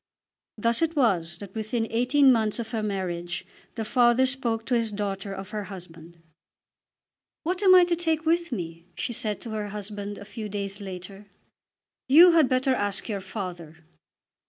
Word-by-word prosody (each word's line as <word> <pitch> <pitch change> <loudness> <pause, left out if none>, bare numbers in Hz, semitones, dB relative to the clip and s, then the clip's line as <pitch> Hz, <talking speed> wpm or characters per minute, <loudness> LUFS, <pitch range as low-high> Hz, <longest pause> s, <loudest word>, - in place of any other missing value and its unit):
Thus 230 +4 +1
it 330 0 +1
was 180 - +1
that 200 -2 -10
within 225 +1 -2
eighteen 260 +4 +4
months 220 -3 +2
of 235 -1 -5
her 225 -2 -1
marriage 180 -4 -3 0.3
the 225 -2 -3
father 240 +2 +4
spoke 240 -4 -1
to 255 - -2
his 230 -2 +1
daughter 200 -1 -3
of 195 +1 -7
her 210 -2 -4
husband. 170 -3 -11 1.3
"What 360 +3 -2
am 375 -2 +7
I 365 - +8
to 350 -1 +1
take 325 -2 -1
with 340 +1 +1
me?" 170 -5 -5
she 240 - -3
said 215 -2 -1
to 230 - -7
her 210 -1 -3
husband 205 0 -5
a 205 - -10
few 215 +1 -7
days 200 0 -4
later. 195 +1 -8 0.8
"You 335 +7 +8
had 320 -5 +4
better 260 +1 +2
ask 205 -5 -2
your 200 -3 -2
father." 180 -6 -7
215 Hz, 170 wpm, -26 LUFS, 195-255 Hz, 1.3 s, I